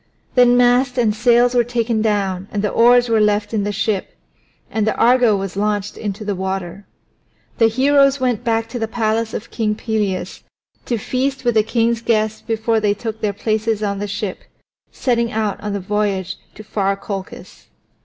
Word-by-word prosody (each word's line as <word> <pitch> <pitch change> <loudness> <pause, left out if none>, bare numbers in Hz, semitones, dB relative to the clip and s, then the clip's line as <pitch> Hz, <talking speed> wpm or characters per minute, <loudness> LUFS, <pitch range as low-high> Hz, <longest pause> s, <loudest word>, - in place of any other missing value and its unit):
Then 245 -1 +5
mast 250 +1 +3
and 225 -4 +2
sails 240 +2 +3
were 245 -1 +4
taken 235 -1 -1
down 195 -3 -1
and 205 -1 -2
the 210 - 0
oars 245 +1 +5
were 225 -2 +2
left 210 0 +1
in 210 -2 0
the 205 - -1
ship, 205 -1 -2 0.6
and 220 -1 0
the 215 - +1
Argo 245 -3 +4
was 195 -1 -5
launched 205 0 -1
into 210 0 -5
the 205 - -1
water. 190 0 -4 0.7
The 225 - +6
heroes 275 +3 +3
went 245 -3 0
back 225 -1 0
to 240 +1 -5
the 225 - -1
palace 225 0 -1
of 220 - -7
King 215 -2 -1
Pelias 210 -4 -3 0.5
to 240 - 0
feast 260 +5 -2
with 240 - +3
the 220 - +4
king's 230 +1 0
guests 220 -2 0
before 225 0 0
they 205 -1 +1
took 220 0 -6
their 210 - 0
places 215 +1 -1
on 200 -1 -1
the 205 - -3
ship, 205 -1 -4 0.5
setting 235 -2 0
out 215 -3 -2
on 210 -1 -4
the 200 - -2
voyage 195 -1 -2 0.2
to 215 - -10
far 200 -2 -1
Colchis. 195 -1 -8
220 Hz, 185 wpm, -19 LUFS, 205-235 Hz, 0.7 s, The